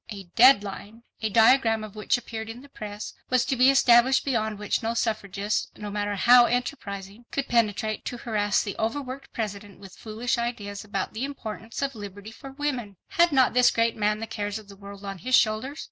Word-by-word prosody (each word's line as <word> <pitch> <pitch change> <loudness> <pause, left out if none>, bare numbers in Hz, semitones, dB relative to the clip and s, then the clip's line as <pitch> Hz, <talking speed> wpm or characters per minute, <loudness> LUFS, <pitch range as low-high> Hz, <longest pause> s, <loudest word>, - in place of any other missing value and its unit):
A 200 -3 -7
"deadline," 225 -2 +3 0.2
a 220 - 0
diagram 225 +1 +4
of 215 -1 -9
which 215 +4 +1
appeared 225 -2 -7
in 230 +2 -8
the 285 - -15
press, 210 -4 -7 0.2
was 255 -1 +2
to 265 - 0
be 255 +1 +5
established 260 -1 +5
beyond 220 -5 -1
which 210 0 -1
no 230 0 -2
suffragist, 210 -2 -1
no 210 -1 -6
matter 205 0 -2
how 240 +4 +7
enterprising, 230 -4 -4
could 275 - -3
penetrate 220 -2 0
to 245 - -4
harass 210 -3 0
the 200 - -5
over 225 +6 -1
worked 270 0 -8
President 205 -2 -5
with 195 -2 -13
foolish 230 +3 -3
ideas 210 -4 -4
about 200 -2 -4
the 220 +4 -4
importance 230 -3 -6
of 275 0 -1
liberty 205 -1 -9
for 270 +4 -11
women. 260 -9 -3
Had 345 -4 +3
not 265 -3 +4
this 250 0 +5
great 230 0 +1
man 210 0 +1
the 225 - -4
cares 210 -2 -4
of 215 -2 -12
the 200 - -11
world 200 0 -11
on 195 -1 -6
his 255 +5 +2
shoulders? 230 +8 +1
220 Hz, 200 wpm, -26 LUFS, 205-245 Hz, 0.2 s, how